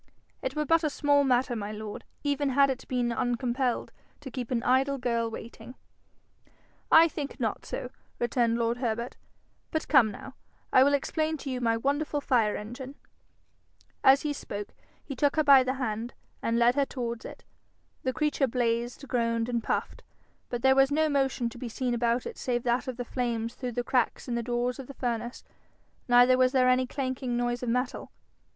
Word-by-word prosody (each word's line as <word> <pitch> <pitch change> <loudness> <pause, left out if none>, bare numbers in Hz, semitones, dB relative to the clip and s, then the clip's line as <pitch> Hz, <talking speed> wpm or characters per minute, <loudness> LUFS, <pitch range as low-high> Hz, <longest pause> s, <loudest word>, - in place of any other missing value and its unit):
'It - - -3
were 300 0 0
but 330 +3 +3
a 305 - +2
small 285 0 +3
matter, 250 -2 +2
my 210 -1 -4
lord, 215 -1 -7 0.2
even 285 -1 0
had 275 +1 +4
it 260 - -7
been 245 -2 0
uncompelled, 245 +1 -1 0.3
to 275 -3 -9
keep 245 -2 -5
an 235 -2 -1
idle 270 +2 +2
girl 235 -2 -1
waiting.' 235 +3 -9 1.2
'I 325 +1 +8
think 295 -3 -6
not - - -2
so,' - - -5 0.3
returned 240 -1 +1
lord 235 0 0
Herbert. 235 -1 -2 0.5
'But 315 - -2
come 260 -7 +5
now, 265 +6 -9 0.4
I 255 - +8
will 285 +1 +4
explain 310 +2 -1
to 275 -1 -6
you 250 -1 -3
my 230 -1 +2
wonderful 290 +4 -1
fire 235 -7 +2
engine.' 250 +6 -7 1.1
As 270 +1 +6
he 300 -1 -1
spoke, 205 -7 -7 0.3
he 275 - -6
took 285 +2 +1
her 310 - +3
by 280 -2 +8
the 260 +1 -1
hand, 235 -2 -3 0.3
and 230 0 0
led 240 +1 +5
her 280 +1 +2
towards 235 -3 -4
it. - - -10 0.6
The 260 - -1
creature 295 0 +1
blazed, 240 +2 -1
groaned, 230 -2 0
and 235 -2 -1
puffed, - - -2 0.5
but 240 -1 -4
there 265 0 +5
was 270 0 +5
no 310 +1 +2
motion 270 -4 +1
to 235 - -12
be 245 - -5
seen 245 +2 -2
about 235 +1 0
it 470 - -7
save 240 -2 -1
that 245 +1 0
of 255 -2 -4
the 245 - -4
flames 235 -2 -2
through 250 -1 -5
the 245 +1 -1
cracks 250 +1 0
in 245 - -2
the 235 - 0
door 240 +1 -1
of 255 0 -9
the 275 - -10
furnace, 240 -1 -3 0.6
neither 245 +1 +6
was 255 +1 +4
there 255 -1 +4
any 255 0 +3
clanking 260 -2 -3
noise 240 0 -1
of 250 - -2
metal. 250 +2 -2
250 Hz, 190 wpm, -28 LUFS, 235-270 Hz, 1.2 s, I